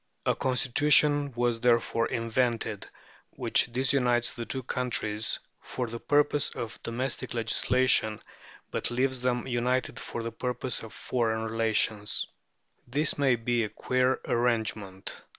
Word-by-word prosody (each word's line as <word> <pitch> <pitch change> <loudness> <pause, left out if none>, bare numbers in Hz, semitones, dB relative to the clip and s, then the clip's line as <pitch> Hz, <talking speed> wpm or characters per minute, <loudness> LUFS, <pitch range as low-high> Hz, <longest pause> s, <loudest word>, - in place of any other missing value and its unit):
A - - +3
constitution 145 +3 +3
was 120 -1 0
therefore 115 -1 +2
invented 115 -2 -1 0.5
which 120 - +3
disunites 125 -1 +2
the 115 -1 -6
two 130 -1 -3
countries 115 -4 -1 0.2
for 125 - -4
the 115 0 -6
purposes 145 +1 +2
of 110 -6 -6
domestic 120 +1 -3
legislation, 115 -1 +2 0.5
but - - -2
leaves 130 +1 0
them 125 -1 -1
united 125 0 -1
for 115 - -6
the 115 - -4
purposes 125 0 -2
of 110 - -11
foreign 110 -3 -1
relations. 110 -2 0 0.6
This 145 +4 0
may 135 -3 +4
be 120 0 0
a 105 - -3
queer 130 +3 0
arrangement. 110 -5 -1
120 Hz, 125 wpm, -28 LUFS, 115-130 Hz, 0.6 s, may